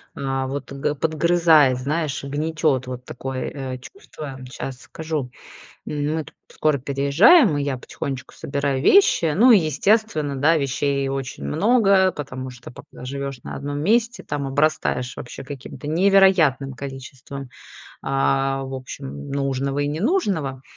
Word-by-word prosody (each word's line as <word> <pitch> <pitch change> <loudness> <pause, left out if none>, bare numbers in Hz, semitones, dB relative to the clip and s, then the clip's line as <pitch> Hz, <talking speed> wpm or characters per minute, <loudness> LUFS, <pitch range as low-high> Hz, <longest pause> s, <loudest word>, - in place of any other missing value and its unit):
а, 135 -1 -2
вот, 140 0 -5
г 140 +2 -2
подгрызает, 160 -3 +3
знаешь, 150 +2 -2
гнетет- 145 -2 -1
вот 125 0 -7
такое, 130 +1 -5 0.3
э, - - -7
чувство, 140 - -10
щас 130 -1 -6
скажу. 155 -5 -4 0.6
М 150 +1 -2
мы 160 -1 -2
тут - - -15
скоро 155 -2 0
переезжаем, 145 - +4
и - - -1
я 140 -2 -1
потихонечку 130 +1 -6
собираю 140 -1 -2
вещи. 170 - +5
Ну 240 +6 +6
и 225 - +8
естественно, 155 - +1
да, 155 +5 +3
вещей 140 -1 0
очень 135 - -4
много, 195 - +3
потому 130 -2 -6
что, 125 0 -12
пока 125 - -13
живешь 140 0 -5
на - - -7
одном 145 +1 -4
месте, 230 - +1
там 145 -1 -3
обрастаешь 135 -3 0
вообще 120 - -8
каким-то 140 +1 -8
невероятным 175 -6 +4
количеством, 135 0 -8 0.5
а, 135 0 +1
в 135 0 -6
общем, 70 - -7
нужного 140 0 -1
и 145 - 0
ненужного. 160 - -1
140 Hz, 140 wpm, -22 LUFS, 135-160 Hz, 0.6 s, и